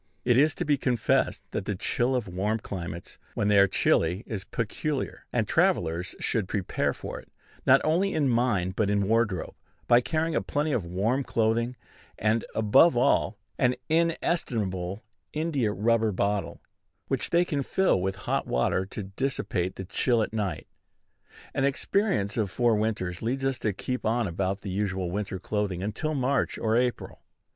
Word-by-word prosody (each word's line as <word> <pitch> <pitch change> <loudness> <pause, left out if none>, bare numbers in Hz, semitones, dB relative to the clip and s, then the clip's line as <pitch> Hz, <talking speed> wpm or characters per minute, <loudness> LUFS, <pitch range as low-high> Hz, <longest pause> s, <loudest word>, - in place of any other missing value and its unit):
It 120 -1 +4
is 145 +4 +4
to 175 - -3
be 145 -2 +3
confessed 125 -4 +1
that - - -3
the 100 - -2
chill 125 +7 0
of 125 -5 -1
warm 95 +5 -1
climates, 85 -5 -7 0.2
when 100 - +1
they 105 -1 +6
are 100 - +6
chilly, 90 +2 +2
is 100 -4 -5
peculiar; 130 +7 -3
and - - 0
travellers 85 +3 +1
should 105 -5 0
prepare 95 -2 -1
for - - -7
it, - - -17 0.4
not - - +7
only 175 +6 +1
in 145 -3 +2
mind, 115 -7 +1
but 105 -1 +1
in 100 -1 +1
wardrobe, 110 -5 +1 0.3
by 120 0 +5
carrying 160 +4 -1
a - - +2
plenty 150 +2 -1
of 115 -10 0
warm 110 +10 0
clothing, 115 +1 0 0.4
and, 110 +2 +1
above 110 +7 +5
all, 120 - +2 0.2
an 125 0 +3
inestimable 115 - 0 0.3
India 150 -8 0
rubber 110 +1 +2
bottle, 100 +1 -1 0.4
which - - -1
they 175 +1 +3
can 145 -5 -1
fill 160 - +2
with 95 +1 -1
hot - - 0
water 95 +9 +1
to 105 - -6
dissipate 95 -3 -2
the 95 - -6
chill 115 +5 +1
at 110 - -5
night. 100 -7 -2 0.9
An 135 - 0
experience 140 - +1
of 105 -4 +1
four 120 +3 +2
winters 105 -5 -2
leads 130 +4 -1
us 135 -2 0
to 110 - 0
keep 125 +6 -4
on 115 0 +1
about 95 +3 -2
the 100 - -5
usual 95 -2 -1
winter 100 0 -3
clothing 95 -1 -2
until 150 +10 -2
March 135 -1 0
or 110 0 +1
April. 125 0 -1
110 Hz, 170 wpm, -27 LUFS, 95-130 Hz, 0.9 s, not